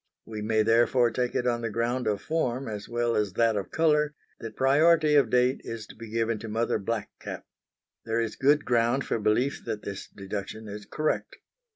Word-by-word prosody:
We 110 -1 -6
may 110 0 +2
therefore 120 +2 +3
take 125 +1 -2
it 125 - 0
on 120 -1 +1
the 115 - -2
ground 120 +2 -1
of 105 -1 -1
form 135 -5 -1
as 105 -2 -6
well 120 0 0
as 105 -3 0
that 115 0 +2
of 100 -2 -3
colour 150 -2 +2 0.2
that 115 -1 -7
priority 150 +3 +4
of 145 -2 +5
date 125 +1 +2
is 115 -2 -6
to - - -14
be 115 0 -10
given 115 0 -1
to 115 - -7
Mother 110 +1 0
Black 110 +2 -3
Cap. - - -7 0.6
There 115 0 -1
is 115 -1 -2
good 145 +2 +3
ground 120 +2 +2
for - - -1
belief 115 +6 +1
that 110 -2 -4
this 100 -1 -6
deduction 100 +2 -6
is 105 0 -8
correct. 155 0 -2
115 Hz, 200 wpm, -27 LUFS, 110-130 Hz, 0.6 s, of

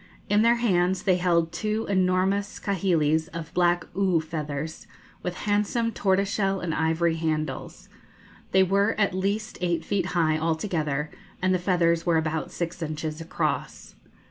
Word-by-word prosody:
In 210 +1 +4
their 235 +1 +5
hands 190 -6 +1
they 185 -3 +3
held 170 -2 +2
two 215 +5 -2
enormous 190 +1 +1
kahilis 165 -5 +1
of 165 0 -6
black 175 -1 +2
oo 190 -4 +2
feathers, 155 -1 -5 0.3
with 180 0 -3
handsome 210 +3 +1
tortoise 195 -1 +1
shell 195 -1 0
and 170 -3 -2
ivory 160 +1 +1
handles. 155 -4 -3 0.6
They 190 0 +5
were 200 +3 +2
at 200 -3 +2
least 200 +4 -2
eight 175 -2 0
feet 195 -3 0
high 155 -2 +2
altogether, 160 -3 -1 0.3
and 185 0 +2
the 185 - +1
feathers 170 -2 +2
were 170 -1 +2
about 160 0 -1
six 170 +1 -4
inches 155 0 -4
across. 165 - -3
175 Hz, 145 wpm, -26 LUFS, 160-195 Hz, 0.6 s, their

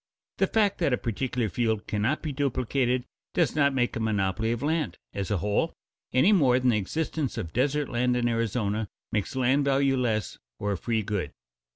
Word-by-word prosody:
The - - +4
fact 210 -3 +2
that 155 -7 +2
a - - +3
particular 120 +1 -1
field 110 +1 -1
cannot 105 +9 -1
be 155 - -2
duplicated 130 -2 0 0.3
does 165 -6 +2
not 140 -2 +4
make 125 -2 0
a - - -2
monopoly 110 0 0
of 120 +2 -2
land 155 +1 0 0.2
as 100 -3 -3
a 105 - +1
whole, 105 +4 0 0.4
any 145 +12 +5
more 130 -9 +4
than 130 0 +2
the 115 - +3
existence 150 +5 -2
of 80 - -4
desert 145 +3 +1
land 125 0 +1
in 120 -1 +1
Arizona 110 -2 -1 0.2
makes 105 +3 -2
land 130 +2 +3
valueless 135 -5 +1 0.2
or 105 - -2
a 100 - -1
free 115 -2 0
good. 100 -2 -3
125 Hz, 185 wpm, -27 LUFS, 110-140 Hz, 0.4 s, any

